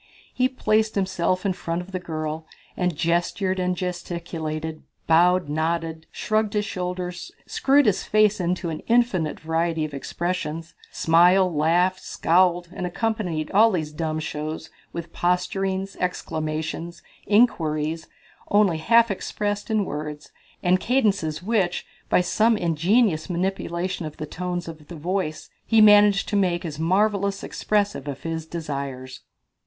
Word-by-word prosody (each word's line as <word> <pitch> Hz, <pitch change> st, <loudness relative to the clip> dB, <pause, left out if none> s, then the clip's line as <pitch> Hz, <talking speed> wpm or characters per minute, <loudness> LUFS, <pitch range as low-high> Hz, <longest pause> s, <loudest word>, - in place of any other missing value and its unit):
He 255 Hz, 0 st, +2 dB
placed 220 Hz, -4 st, +1 dB
himself 185 Hz, -1 st, 0 dB
in 195 Hz, -, +2 dB
front 170 Hz, -1 st, -3 dB
of 180 Hz, +2 st, -8 dB
the 185 Hz, -, -3 dB
girl 155 Hz, -2 st, -4 dB, 0.3 s
and 180 Hz, -2 st, 0 dB
gestured 175 Hz, +3 st, 0 dB
and 180 Hz, 0 st, 0 dB
gesticulated, 165 Hz, -3 st, -4 dB, 0.2 s
bowed, 175 Hz, +1 st, +4 dB
nodded, 160 Hz, +1 st, -2 dB
shrugged 215 Hz, -1 st, 0 dB
his 210 Hz, -1 st, 0 dB
shoulders, 180 Hz, -2 st, -4 dB
screwed 280 Hz, +1 st, +3 dB
his 205 Hz, -, +2 dB
face 215 Hz, -1 st, +3 dB
into 175 Hz, -1 st, -1 dB
an 155 Hz, -, -4 dB
infinite 230 Hz, -10 st, +2 dB
variety 160 Hz, 0 st, 0 dB
of 150 Hz, -, -8 dB
expressions, 165 Hz, +2 st, -4 dB, 0.2 s
smiled, 180 Hz, +2 st, +4 dB
laughed, 175 Hz, +5 st, +2 dB
scowled 175 Hz, 0 st, +2 dB
and 180 Hz, -, -3 dB
accompanied 180 Hz, -6 st, -2 dB
all 220 Hz, +3 st, +6 dB
these 160 Hz, -7 st, -2 dB
dumb 155 Hz, 0 st, -2 dB
shows 155 Hz, +1 st, -5 dB, 0.2 s
with 170 Hz, 0 st, -7 dB
posturings, 190 Hz, +2 st, -1 dB
exclamations, 160 Hz, -1 st, -3 dB, 0.5 s
queries, 155 Hz, -1 st, -3 dB, 0.4 s
only 205 Hz, -5 st, +3 dB
half 230 Hz, +6 st, +4 dB
expressed 205 Hz, +1 st, -3 dB
in 215 Hz, -2 st, +1 dB
words, 150 Hz, -1 st, -6 dB, 0.3 s
and 185 Hz, +1 st, +3 dB
cadences 200 Hz, -, 0 dB
which, 195 Hz, -4 st, 0 dB, 0.2 s
by -, -, +4 dB
some 220 Hz, +5 st, +2 dB
ingenious 175 Hz, +2 st, +2 dB
manipulation 180 Hz, -1 st, -2 dB
of 150 Hz, -, -10 dB
the 155 Hz, -, -4 dB
tones 175 Hz, +2 st, -4 dB
of 155 Hz, -2 st, -10 dB
the 175 Hz, -, -8 dB
voice, 165 Hz, 0 st, -3 dB
he 225 Hz, -, +3 dB
managed 205 Hz, -2 st, +6 dB
to 210 Hz, -, -2 dB
make 180 Hz, -3 st, +1 dB
as 155 Hz, -2 st, -5 dB
marvellous 200 Hz, +3 st, +1 dB
expressive 205 Hz, -8 st, -1 dB
of 140 Hz, -2 st, -6 dB
his 160 Hz, -1 st, -4 dB
desires. 140 Hz, -6 st, -5 dB
175 Hz, 135 wpm, -24 LUFS, 160-195 Hz, 0.5 s, all